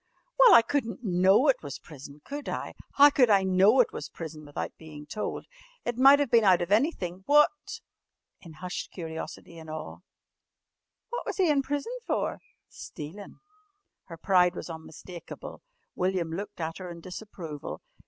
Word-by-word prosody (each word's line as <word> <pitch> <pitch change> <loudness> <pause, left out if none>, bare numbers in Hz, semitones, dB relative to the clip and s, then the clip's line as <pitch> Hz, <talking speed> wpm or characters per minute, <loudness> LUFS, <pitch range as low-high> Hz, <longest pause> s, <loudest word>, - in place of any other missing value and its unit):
"Well, - - +9
I 230 - +8
couldn't 230 -1 -2
know 190 +6 +4
it 270 - +3
was 140 -2 -7
prison, 145 -1 -13
could 290 0 -6
I? - - -4 0.2
How 290 +1 +7
could 250 -4 +4
I 200 -2 +5
know 190 +6 +4
it 240 - -1
was - - -6
prison 160 -2 -8
without 145 -1 -6
bein' 150 -2 -11
told? 210 +8 -5 0.4
It 240 - -2
might 270 +3 +7
of 285 -4 0
been 230 -1 +5
out 185 -3 +5
of 175 - -7
anything. 205 - 0
What 295 +1 +3 0.2
" - - -55
in 165 -3 -12
hushed 180 +4 -6
curiosity 165 0 -8
and 160 -1 -11
awe 155 0 -7 1.1
"what 485 - -3
was - - -3
he 365 -5 +3
in 280 -2 +3
prison 290 - -3
for?" - - -1 0.3
"Stealin'." 165 +7 -10 0.6
Her 165 - -10
pride 180 0 +3
was - - -6
unmistakable. 165 +2 -10 0.3
William 180 -3 -1
looked 200 +4 -6
at 165 +1 -4
her 185 -1 -7
in 170 -1 -9
disapproval. 180 -5 -8
185 Hz, 165 wpm, -28 LUFS, 165-245 Hz, 1.1 s, Well